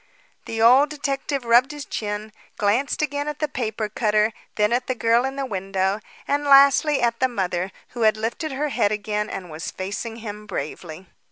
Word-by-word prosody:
The 225 - -4
old 260 +5 +6
detective 280 -2 -3
rubbed 240 +3 +5
his 295 -2 -7
chin, 210 0 -4 0.3
glanced 230 +9 +1
again 285 0 -2
at 300 -1 -3
the 305 - -1
paper 220 -5 -3
cutter, 215 0 +1 0.2
then 210 +1 +2
at 250 +1 0
the 255 - -1
girl 230 +2 +3
in 270 0 -3
the 275 -1 -2
window, 195 -2 -1 0.3
and 285 +1 +1
lastly 280 0 +5
at 235 -1 +1
the 260 - +3
mother, 185 -5 -2 0.2
who 240 - -7
had 215 -1 +4
lifted 235 +8 -3
her 295 +3 -1
head 205 -6 +1
again 210 0 -2
and 180 -3 -6
was 155 +1 -5
facing 205 +4 -5
him 210 -2 -8
bravely. 160 0 -6
230 Hz, 185 wpm, -23 LUFS, 210-275 Hz, 0.3 s, old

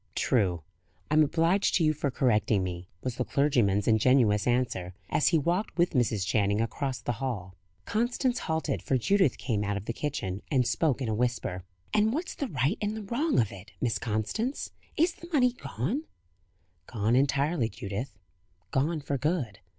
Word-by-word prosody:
"True. 90 -10 +1 0.5
I - - +2
am 155 - +6
obliged 165 +6 +2
to 175 - +3
you 155 -1 +4
for 145 -1 -1
correcting 110 -6 +2
me," 90 0 -5
was 125 -1 -3
the 125 - +1
clergyman's 120 -9 +2
ingenuous 110 -2 +4
answer, 120 -8 0 0.2
as 150 0 +3
he 170 - +4
walked, 170 +6 -1
with 175 0 +3
Mrs. 110 -7 +1
Channing, 100 0 +1
across 130 +3 -2
the - - -2
hall. 100 -9 -3 0.3
Constance 240 +3 0
halted, 160 -3 -2
for 130 - +1
Judith 190 - +2
came 105 -4 -1
out 105 0 -1
of 100 - -6
the 115 - -2
kitchen, 100 -9 -3
and 130 -4 +2
spoke 140 -1 +1
in - - -2
a 110 - 0
whisper. 110 -6 -1 0.3
"And 215 +1 +3
what's 330 +6 -3
the 280 - -3
right 145 - 0
and 210 +1 -1
the 215 - -5
wrong 270 +10 +1
of 110 -4 +1
it, 100 +2 -12
Miss 120 -3 0
Constance? 115 - -2 0.3
Is 335 +2 +3
the 340 - -12
money 250 -6 +3
gone?" 160 - -3 0.8
"Gone 115 0 +1
entirely, 140 -1 +2
Judith. 100 +3 -5 0.5
Gone 150 +4 0
for 140 -1 -2
good." 140 - -1
130 Hz, 175 wpm, -28 LUFS, 110-170 Hz, 0.8 s, am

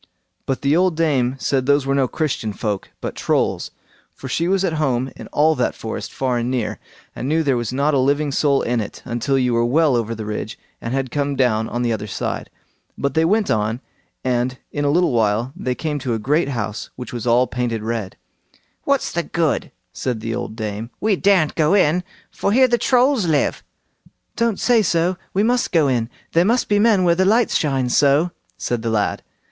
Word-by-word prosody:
But 135 0 -2
the 140 +2 +3
old 180 -1 +2
dame 135 -6 +1
said 130 -1 0
those 145 -1 +3
were 135 - +1
no 135 -2 +2
Christian 125 -8 -2
folk, 105 -2 -3
but - - -4
Trolls, - - 0 0.5
for 135 - -8
she 165 +6 0
was 195 +1 +2
at 170 - -1
home 130 -2 0
in - - -9
all 155 +2 +3
that 125 -5 -1
forest 110 - -5
far 125 -2 -1
and 120 +1 -2
near, 125 -4 -2 0.4
and 130 - -4
knew 160 +1 +2
there 140 -3 +2
was 120 -1 -2
not 140 +4 +1
a 140 - +3
living 140 +2 +1
soul 140 0 +2
in 120 -1 0
it, 105 - -8
until 125 +2 0
you 125 -2 +1
were 115 0 +2
well 145 +3 +3
over 115 -1 -1
the 110 -1 -6
ridge, 105 0 -4 0.2
and 115 +3 -3
had 135 -2 -2
come 145 -1 -1
down 110 -4 +1
on 120 +1 -2
the 120 -1 +1
other 105 -1 -4
side. - - -4 0.5
But 140 - -1
they 160 - +3
went 210 +4 +2
on, 110 +2 0 0.4
and 125 0 0
in 145 0 -2
a - - +3
little 175 +3 +3
while 115 +2 +1
they 130 -9 -2
came 150 0 -3
to 125 -4 -2
a - - -1
great 140 +7 +1
house 110 -5 -4
which 125 - -8
was 120 -1 -4
all 120 +2 +4
painted 120 -3 -3
red. 110 -4 -3 0.7
"What's 280 -1 +1
the 170 - 0
good?" 165 -3 -1 0.2
said 125 -4 -3
the 115 +1 -4
old 110 - -4
dame, 110 0 -4
"we 215 -1 +2
daren't 185 -5 +3
go 160 +4 +3
in, 180 -2 +3 0.3
for 200 - -1
here 260 +4 +5
the 240 -1 +1
Trolls 255 -5 +3
live." 150 -3 +1 0.7
"Don't 230 -4 0
say 240 -3 +4
so; 175 -1 +1 0.2
we 200 - +3
must 245 +2 +1
go 160 -4 +3
in. 120 -3 0 0.2
There 170 - +4
must 235 +6 +1
be 205 0 +3
men 210 -3 +4
where 175 -1 +4
the 185 +2 +2
lights 220 +4 +3
shine 135 -4 +1
so", 145 +6 +3 0.3
said 120 -2 -2
the 115 - -2
lad. 105 -2 0
135 Hz, 210 wpm, -20 LUFS, 120-165 Hz, 0.7 s, here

